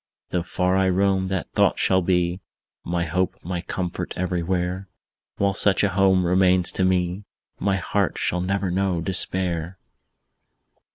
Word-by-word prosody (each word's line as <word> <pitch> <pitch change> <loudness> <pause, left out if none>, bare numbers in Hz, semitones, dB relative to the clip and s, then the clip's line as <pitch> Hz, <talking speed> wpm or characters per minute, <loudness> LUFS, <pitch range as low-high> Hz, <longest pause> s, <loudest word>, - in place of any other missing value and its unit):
Though 90 - 0
far 90 +2 0
I 95 -1 +2
roam, 95 0 +1
that 95 -1 -3
thought - - +2
shall 95 0 +2
be 90 0 0 0.4
My 85 0 -1
hope, 90 +3 -1
my 90 0 -3
comfort, 90 0 -4
everywhere; 90 +1 -2 0.5
While 100 0 +1
such 100 +1 +2
a 100 - +3
home 95 -1 +3
remains 90 0 +3
to 95 - -1
me, 95 +1 0 0.3
My 100 -1 +1
heart 100 +1 -1
shall 90 - -1
never 95 0 -1
know 95 -2 0
despair! 90 -1 0
95 Hz, 145 wpm, -23 LUFS, 90-95 Hz, 0.5 s, a